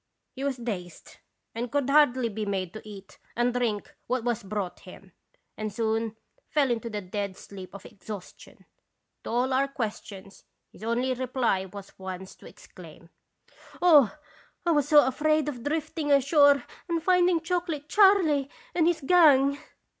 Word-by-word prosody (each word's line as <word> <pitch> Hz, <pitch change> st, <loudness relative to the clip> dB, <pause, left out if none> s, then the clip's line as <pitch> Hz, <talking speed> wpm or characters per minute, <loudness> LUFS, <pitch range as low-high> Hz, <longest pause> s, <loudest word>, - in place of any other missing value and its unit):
"He 265 Hz, -, -7 dB
was 275 Hz, -2 st, -1 dB
dazed 190 Hz, -8 st, -7 dB, 0.4 s
and 235 Hz, +1 st, -4 dB
could 285 Hz, -2 st, 0 dB
hardly 275 Hz, -4 st, +4 dB
be 220 Hz, -1 st, -4 dB
made 190 Hz, -3 st, -3 dB
to 215 Hz, -, -8 dB
eat 200 Hz, -2 st, -12 dB, 0.2 s
and 240 Hz, +1 st, +1 dB
drink 230 Hz, -4 st, -2 dB
what 250 Hz, -1 st, -1 dB
was 240 Hz, -2 st, -1 dB
brought 195 Hz, -2 st, -4 dB
him, 185 Hz, 0 st, -14 dB, 0.4 s
and 215 Hz, 0 st, -4 dB
soon 225 Hz, +1 st, -1 dB, 0.3 s
fell 280 Hz, -4 st, +2 dB
into 230 Hz, 0 st, -2 dB
the 210 Hz, -2 st, -4 dB
dead 195 Hz, 0 st, -4 dB
sleep 195 Hz, -1 st, -11 dB
of 200 Hz, -, -11 dB
exhaustion. 205 Hz, -2 st, -11 dB, 0.6 s
To -, -, -7 dB
all 250 Hz, +3 st, 0 dB
our 270 Hz, +2 st, +2 dB
questions 210 Hz, -6 st, -7 dB, 0.3 s
his -, -, -15 dB
only 245 Hz, +3 st, 0 dB
reply 250 Hz, -6 st, -1 dB
was 195 Hz, +1 st, -12 dB
once 190 Hz, 0 st, -7 dB
to -, -, -14 dB
exclaim: -, -, -15 dB, 0.7 s
"'Oh! 305 Hz, -6 st, +5 dB, 0.5 s
I 340 Hz, -, +3 dB
was 295 Hz, -3 st, +2 dB
so 295 Hz, -1 st, +7 dB
afraid 305 Hz, +3 st, +1 dB
of 255 Hz, -5 st, -4 dB
drifting 310 Hz, 0 st, -2 dB
ashore 280 Hz, 0 st, +5 dB, 0.3 s
and 335 Hz, -1 st, -1 dB
finding 360 Hz, -1 st, +3 dB
Chocolate 325 Hz, -3 st, -3 dB
Charley 360 Hz, -10 st, +4 dB, 0.2 s
and 330 Hz, -2 st, +2 dB
his 345 Hz, -2 st, +1 dB
gang!'" 280 Hz, -3 st, +5 dB
250 Hz, 155 wpm, -27 LUFS, 210-295 Hz, 0.7 s, so